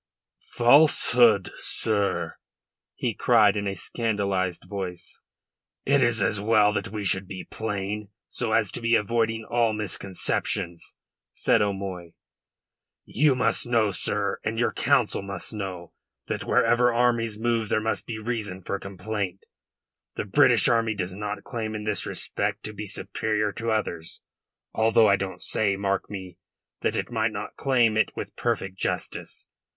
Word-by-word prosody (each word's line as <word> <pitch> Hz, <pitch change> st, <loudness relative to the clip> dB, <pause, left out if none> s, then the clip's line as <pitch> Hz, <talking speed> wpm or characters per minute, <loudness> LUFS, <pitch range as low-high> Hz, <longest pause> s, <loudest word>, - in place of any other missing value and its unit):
"Falsehood, 120 Hz, -5 st, +5 dB
sir?" 105 Hz, -3 st, -1 dB, 0.6 s
he 120 Hz, -, -1 dB
cried 110 Hz, -2 st, +4 dB
in 100 Hz, -1 st, -2 dB
a 100 Hz, -, -2 dB
scandalised 100 Hz, -3 st, -1 dB
voice. 95 Hz, -4 st, -6 dB, 0.7 s
"It 140 Hz, 0 st, +3 dB
is 120 Hz, -4 st, +3 dB
as 100 Hz, 0 st, +2 dB
well 105 Hz, -1 st, +4 dB
that 100 Hz, -2 st, -2 dB
we 105 Hz, +1 st, -5 dB
should 95 Hz, 0 st, +1 dB
be 95 Hz, -1 st, -7 dB
plain, 105 Hz, -1 st, -4 dB, 0.2 s
so 120 Hz, -3 st, -3 dB
as 110 Hz, -3 st, +2 dB
to -, -, -4 dB
be 115 Hz, 0 st, +3 dB
avoiding 115 Hz, +1 st, 0 dB
all 115 Hz, -1 st, +1 dB
misconceptions," 95 Hz, -3 st, -2 dB, 0.4 s
said -, -, +3 dB
O'Moy. 95 Hz, -4 st, -3 dB, 0.9 s
"You 145 Hz, -2 st, +2 dB
must 125 Hz, 0 st, +1 dB
know, 115 Hz, -4 st, +2 dB
sir, 100 Hz, +1 st, 0 dB
and 110 Hz, +1 st, -2 dB
your 120 Hz, -, +2 dB
Council -, -, +2 dB
must 100 Hz, 0 st, -6 dB
know, 95 Hz, -5 st, -6 dB, 0.3 s
that -, -, -4 dB
wherever 120 Hz, +1 st, +3 dB
armies 115 Hz, -2 st, +1 dB
move 115 Hz, -1 st, 0 dB
there -, -, +2 dB
must 110 Hz, +1 st, -2 dB
be 115 Hz, -, -4 dB
reason 105 Hz, -4 st, -4 dB
for 100 Hz, -, -3 dB
complaint. 95 Hz, -1 st, -4 dB, 0.7 s
The -, -, -3 dB
British 125 Hz, +2 st, +5 dB
army 115 Hz, -2 st, +2 dB
does 90 Hz, -2 st, -3 dB
not 105 Hz, +1 st, -5 dB
claim 110 Hz, -4 st, -4 dB
in 105 Hz, -, -4 dB
this 105 Hz, -1 st, 0 dB
respect -, -, -2 dB
to 105 Hz, -, -6 dB
be 105 Hz, +1 st, -6 dB
superior 105 Hz, +1 st, -1 dB
to 115 Hz, +2 st, -4 dB
others 85 Hz, -7 st, -3 dB, 0.5 s
although 110 Hz, 0 st, +4 dB
I 100 Hz, -, +5 dB
don't 95 Hz, -1 st, -5 dB
say, 100 Hz, -2 st, +1 dB
mark 100 Hz, 0 st, -1 dB
me, 95 Hz, -3 st, -8 dB, 0.4 s
that -, -, 0 dB
it -, -, -3 dB
might -, -, +1 dB
not -, -, -6 dB
claim 120 Hz, -5 st, +2 dB
it 110 Hz, -, +1 dB
with -, -, -6 dB
perfect 95 Hz, 0 st, -2 dB
justice. -, -, -3 dB
105 Hz, 150 wpm, -26 LUFS, 100-115 Hz, 0.9 s, Falsehood